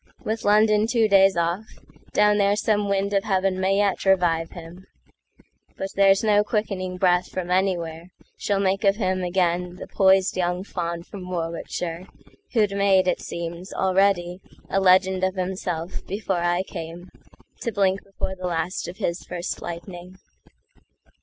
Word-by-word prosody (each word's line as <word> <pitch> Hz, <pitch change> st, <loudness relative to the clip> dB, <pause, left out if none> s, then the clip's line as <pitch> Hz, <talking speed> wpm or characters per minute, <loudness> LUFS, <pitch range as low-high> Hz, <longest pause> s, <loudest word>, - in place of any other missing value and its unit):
With 220 Hz, +1 st, -2 dB
London 210 Hz, +1 st, +4 dB
two 230 Hz, -2 st, +2 dB
days 195 Hz, -2 st, +5 dB
off, 170 Hz, +4 st, 0 dB, 0.5 s
Down 210 Hz, 0 st, +3 dB
there 200 Hz, 0 st, +3 dB
some 210 Hz, -1 st, 0 dB
wind 200 Hz, +1 st, 0 dB
of 195 Hz, -1 st, +2 dB
heaven 190 Hz, -2 st, 0 dB
may 190 Hz, +1 st, +2 dB
yet 200 Hz, -2 st, +1 dB
revive 175 Hz, -4 st, +2 dB
him; 175 Hz, +2 st, -11 dB, 0.9 s
But 195 Hz, -, -4 dB
there's 195 Hz, 0 st, +4 dB
no 210 Hz, -1 st, +4 dB
quickening 195 Hz, -4 st, -2 dB
breath 180 Hz, -1 st, +2 dB
from 180 Hz, -1 st, -5 dB
anywhereSmall 180 Hz, +2 st, -2 dB
make 195 Hz, +1 st, 0 dB
of 195 Hz, -1 st, +4 dB
him 185 Hz, -3 st, -1 dB
again 180 Hz, 0 st, 0 dB
the -, -, -8 dB
poised 190 Hz, -1 st, +3 dB
young 180 Hz, 0 st, -1 dB
faunFrom 175 Hz, +1 st, -5 dB
Warwickshire, 170 Hz, 0 st, -4 dB, 0.5 s
who'd 215 Hz, -4 st, +3 dB
made, 195 Hz, -2 st, +3 dB
it -, -, 0 dB
seems, 170 Hz, +2 st, -6 dB
alreadyA 185 Hz, -2 st, +1 dB, 0.3 s
legend 190 Hz, 0 st, +3 dB
of 190 Hz, 0 st, +1 dB
himself 180 Hz, -2 st, -4 dB
before 195 Hz, -1 st, -2 dB
I 175 Hz, +1 st, +1 dB
cameTo 175 Hz, +7 st, -9 dB
blink 195 Hz, -2 st, +1 dB
before 195 Hz, -1 st, -5 dB
the 185 Hz, -1 st, -5 dB
last 170 Hz, +1 st, -2 dB
of 175 Hz, +2 st, -8 dB
his 180 Hz, -4 st, -2 dB
first 175 Hz, 0 st, -5 dB
lightning. 175 Hz, +1 st, -8 dB
185 Hz, 140 wpm, -24 LUFS, 175-200 Hz, 0.9 s, days